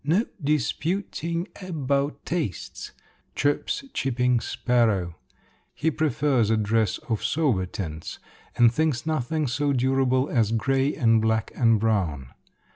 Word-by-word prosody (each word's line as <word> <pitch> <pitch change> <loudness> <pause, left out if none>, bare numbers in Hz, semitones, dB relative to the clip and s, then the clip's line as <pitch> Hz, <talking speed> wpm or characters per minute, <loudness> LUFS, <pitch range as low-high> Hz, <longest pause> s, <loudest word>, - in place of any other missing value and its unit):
"No 175 - +2 0.2
dis 145 -5 +1
pu 185 +6 -1
ting 170 +3 -3
a 185 -1 -7
bout 140 -2 -1
tastes!" 155 - -4 0.4
chirps 145 - 0
chipping 125 -2 +1
sparrow. 110 -10 0 0.6
He 160 +2 0
prefers 140 -6 +1
a 110 - +3
dress 110 0 +1
of 110 -2 -2
sober 115 - +1
tints 80 -4 -6 0.4
and 120 -1 +5
thinks 155 -3 0
nothing 155 0 -1
so 140 +3 0
durable 130 +1 +2
as 115 -4 +1
gray 135 +4 +1
and 115 -2 +3
black 110 -1 0
and 115 -3 +3
brown. 90 - 0
125 Hz, 130 wpm, -25 LUFS, 110-145 Hz, 0.6 s, and